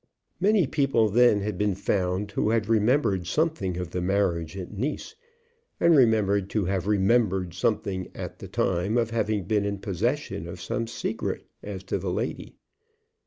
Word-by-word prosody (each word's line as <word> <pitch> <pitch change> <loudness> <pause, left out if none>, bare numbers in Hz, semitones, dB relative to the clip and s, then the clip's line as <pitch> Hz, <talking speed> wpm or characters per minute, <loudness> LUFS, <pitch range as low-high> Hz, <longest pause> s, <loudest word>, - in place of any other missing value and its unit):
Many 200 -1 +4
people 135 -6 +2
then 115 -1 +4
had 100 -2 -3
been 105 -2 +1
found 100 0 -1
who 105 - 0
had 110 -2 +1
remembered 110 - +2
something 150 - 0
of 90 -1 -4
the 90 - -2
marriage 90 -3 0
at 90 -2 -6
Nice, 135 - -4 0.6
and 170 -1 +5
remembered 105 -6 +3
to 105 -4 0
have 95 0 -1
remembered 95 -3 +2
something 95 -1 -1
at - - -7
the - - -8
time 95 +5 0
of 115 -1 +1
having 110 -3 0
been 105 +3 +1
in 100 0 -2
possession 100 - -2
of 90 +1 -8
some 115 +5 -3
secret 115 - -3 0.2
as 95 -2 -7
to 95 - -2
the - - -3
lady. - - -4
100 Hz, 165 wpm, -26 LUFS, 95-115 Hz, 0.6 s, and